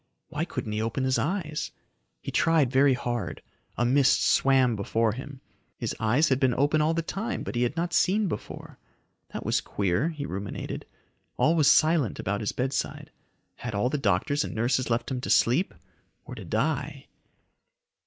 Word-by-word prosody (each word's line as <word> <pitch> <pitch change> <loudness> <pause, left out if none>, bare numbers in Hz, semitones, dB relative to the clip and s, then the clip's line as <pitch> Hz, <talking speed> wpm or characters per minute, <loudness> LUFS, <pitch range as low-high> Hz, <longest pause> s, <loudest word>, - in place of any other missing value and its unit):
Why - - -2
couldn't 105 - -5
he 105 +1 -1
open 115 +4 -2
his 130 0 +1
eyes? 155 -3 -2 0.5
He - - -4
tried 160 -6 +3
very 135 0 +4
hard. 120 -2 -4 0.3
A 120 - +2
mist 135 +2 +4
swam 130 -3 +3
before 110 +2 0
him. 135 +3 -8 0.4
His - - -3
eyes 125 +8 +2
had 130 -1 +2
been 130 -3 +2
open 145 +3 +2
all 160 +2 +2
the 165 - -1
time 220 +8 -3
but - - -5
he 120 - -1
had 125 +6 0
not 170 +1 -1
seen 205 +2 +3
before. 165 - -7 0.5
That - - -6
was - - +1
queer, 100 - 0
he 150 -4 -5
ruminated. 100 -2 -5 0.5
All 160 - +3
was 155 -4 +5
silent 155 - +3
about 100 +2 -2
his 105 - -1
bedside. 130 +2 -3 0.5
Had 120 -4 -5
all 120 +6 +1
the 150 - -1
doctors 110 +6 +1
and - - -6
nurses 120 +3 0
left 120 +3 -1
him 125 -1 -2
to - - -5
sleep 135 +12 +3 0.5
or - - -8
to - - -8
die? - - -2
130 Hz, 175 wpm, -27 LUFS, 115-155 Hz, 0.5 s, was